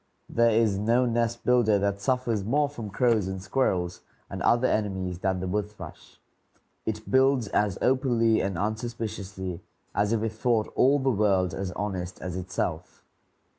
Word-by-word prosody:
There 115 0 +4
is 110 -3 +2
no 115 +4 +3
nest 115 0 -1
builder 120 -4 +4
that 100 0 -1
suffers 120 -3 0
more 145 +8 +2
from 120 -7 -7
crows 110 -1 +2
and 95 0 -4
squirrels 95 -4 -1 0.3
and - - -5
other 120 +2 +3
enemies 95 -4 -1
than 95 -1 0
the 95 - -3
wood 105 +2 -1
thrush. 105 - -12 0.7
It 110 0 -4
builds 130 -4 +3
as 100 -3 +1
openly 120 -4 +3
and 95 -2 -2
unsuspiciously 105 -4 -4 0.3
as 105 +1 +1
if 115 -1 +1
it 115 - -1
thought 110 0 0
all 135 +3 +4
the 135 -1 +1
world 95 -5 +2
as 95 +3 -3
honest 95 -3 -4
as 90 -1 -5
itself. 90 -2 -4
105 Hz, 160 wpm, -27 LUFS, 95-120 Hz, 0.7 s, There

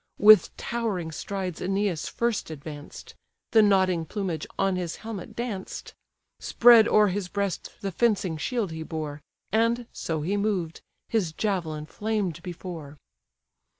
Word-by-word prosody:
With 210 -3 +7
towering 210 -9 -2
strides 185 +1 -4
Æneas 195 -3 -1
first 235 -6 -1
advanced; 150 -1 -9 0.4
The 220 - +7
nodding 190 -5 +3
plumage 180 -6 -3
on 195 -1 +2
his 175 -3 -3
helmet 215 -5 -6
danced: 225 -6 -5 0.5
Spread 235 -2 +7
o'er 210 -1 +5
his 190 0 -2
breast 200 0 -2
the 195 - -2
fencing 195 -5 +1
shield 220 +2 -1
he 160 0 -6
bore, 155 -2 -5 0.3
And, 230 +2 +2
so 160 -2 -3
he 195 +6 0
moved, 195 -6 -1 0.3
his 195 -8 0
javelin 160 -6 -2
flamed 205 -2 -2
before. 165 -4 -7
190 Hz, 130 wpm, -26 LUFS, 160-215 Hz, 0.5 s, With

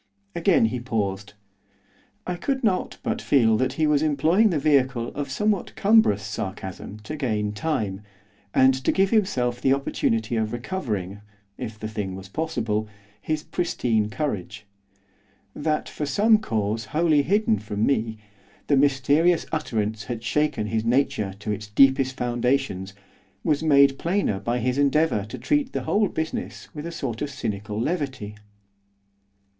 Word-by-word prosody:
Again 170 - +3
he 120 +3 -1
paused. 105 -4 -3 0.9
I 180 - -2
could 265 +9 -2
not 195 -5 0
but - - -2
feel 115 -5 +4
that 130 +1 0
he 155 +2 +1
was 150 -1 +3
employing 160 +8 +3
the 170 - 0
vehicle 135 -5 +2
of 145 -1 -5
somewhat 205 +7 -1
cumbrous 200 - +4
sarcasm 95 -1 -6
to 150 +9 -6
gain 110 -8 -1
time, 105 -7 -2 0.5
and 130 +4 +5
to - - +3
give 195 0 +2
himself 125 - +1
the 135 - +4
opportunity 115 -4 0
of 110 0 -1
recovering, 110 - -4 0.3
if 110 +1 -6
the 110 - -5
thing 105 -3 -4
was 95 0 -10
possible, 110 -7 -2 0.3
his 155 +7 -2
pristine 115 - 0
courage. 110 - -4 0.9
That, 155 +1 -1
for 150 - -4
some 215 +9 +4
cause 110 - -2
wholly 155 -2 +2
hidden 195 - +2
from 105 0 -2
me, 110 -5 0 0.5
the 140 - +3
mysterious 145 +5 +3
utterance 110 -8 -2
had 120 -2 -5
shaken 150 -2 0
his 110 +1 -1
nature 115 -5 +1
to 105 - -3
its 105 0 -4
deepest 130 +4 +4
foundations, 120 -5 -1 0.5
was 150 -1 +1
made 140 -3 +5
plainer 170 - 0
by 115 +5 -1
his 125 +3 0
endeavour 145 -6 +2
to 110 - -8
treat 290 -3 0
the - - -2
whole 210 0 +2
business 160 -2 -5
with 150 +2 -6
a - - -5
sort 125 -8 -4
of 145 - -2
cynical 105 -4 -4
levity. 135 - -2
130 Hz, 150 wpm, -24 LUFS, 110-155 Hz, 0.9 s, and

